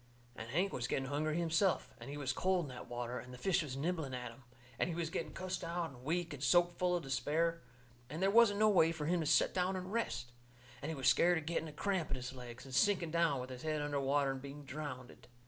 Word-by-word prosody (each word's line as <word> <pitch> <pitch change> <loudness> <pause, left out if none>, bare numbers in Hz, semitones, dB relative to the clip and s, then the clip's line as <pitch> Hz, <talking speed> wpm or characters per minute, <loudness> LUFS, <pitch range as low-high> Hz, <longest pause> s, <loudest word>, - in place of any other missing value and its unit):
And 115 -2 -7
Hank 180 +9 +1
was 125 0 -2
getting 135 +1 -1
hungry 155 +2 0
himself. 170 +2 +1
And - - -8
he 145 - -5
was 135 -3 -1
cold 185 +2 +1
in - - -8
that 125 -1 -8
water. 120 0 -3
And 125 - -10
the 125 - -9
fish 185 +7 +2
was 135 -4 -5
nibbling 155 -3 -2
at 125 -1 -5
him. 115 - -16 0.4
And - - +1
he 165 - -2
was 165 -1 -2
getting - - -3
cussed 185 -1 -4
out 170 -1 -2
and 125 -2 -14
weak 165 +3 -1
and 140 - -8
soaked 175 +6 +4
full 180 -1 +2
of 175 - -2
despair. 160 +5 0 0.5
And 155 +4 -5
they 190 - +3
wasn't 210 -1 +6
no 215 +1 +5
way 165 -5 +5
fur 160 -3 -4
him 175 +3 +2
to 160 - -1
set - - +4
down 185 +1 +1
and 185 +2 -5
rest. 170 - -2 0.5
And 150 - -4
he 160 - -2
was 135 -3 -1
scared 175 +1 +5
of 160 - -4
getting 165 0 -1
a - - -7
cramp 185 +2 -1
in 135 - -1
his 125 +1 -6
legs, 125 -1 -9
and 135 - -10
sinking 180 0 +3
down 170 -5 +2
with 130 +1 -7
his 125 -1 -7
head 155 -1 -1
under 145 -1 -1
water 140 0 +2
and 135 -1 -5
being 140 +1 -9
drownded. 135 -3 -7
155 Hz, 260 wpm, -35 LUFS, 135-175 Hz, 0.5 s, wasn't